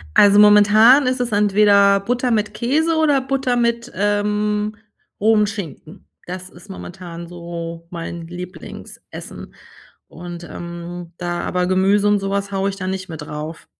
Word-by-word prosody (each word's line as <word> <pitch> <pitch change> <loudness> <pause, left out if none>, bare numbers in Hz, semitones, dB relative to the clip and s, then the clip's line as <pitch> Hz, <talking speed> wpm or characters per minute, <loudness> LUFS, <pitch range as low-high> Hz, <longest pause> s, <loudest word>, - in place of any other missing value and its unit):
Also, 205 0 +6
momentan 210 +6 +6
ist 255 0 0
es 245 -2 -2
entweder 200 -1 +4
Butter 245 +4 -1
mit 210 -1 0
Käse 295 +9 0
oder 295 -4 +3
Butter 265 -2 -1
mit, 235 0 -1
ähm, 210 +1 0 0.5
rohem 215 0 +4
Schinken. 195 -7 -8 0.2
Das 185 +1 -7
ist 180 +4 -17
momentan 175 -2 -9
so 170 -1 -8
mein 170 -1 -6
Lieblingsessen. 180 +2 -10 0.5
Und, 175 -1 -9
ähm, 170 0 -8
da 175 -1 -3
aber 180 0 -1
Gemüse 195 +2 +2
und 205 0 +3
sowas 200 +1 -3
haue 195 0 0
ich 195 - -5
da 185 -1 -5
nicht 190 0 -4
mit 160 -2 -8
drauf. 150 +2 -7
200 Hz, 145 wpm, -20 LUFS, 175-215 Hz, 0.5 s, Also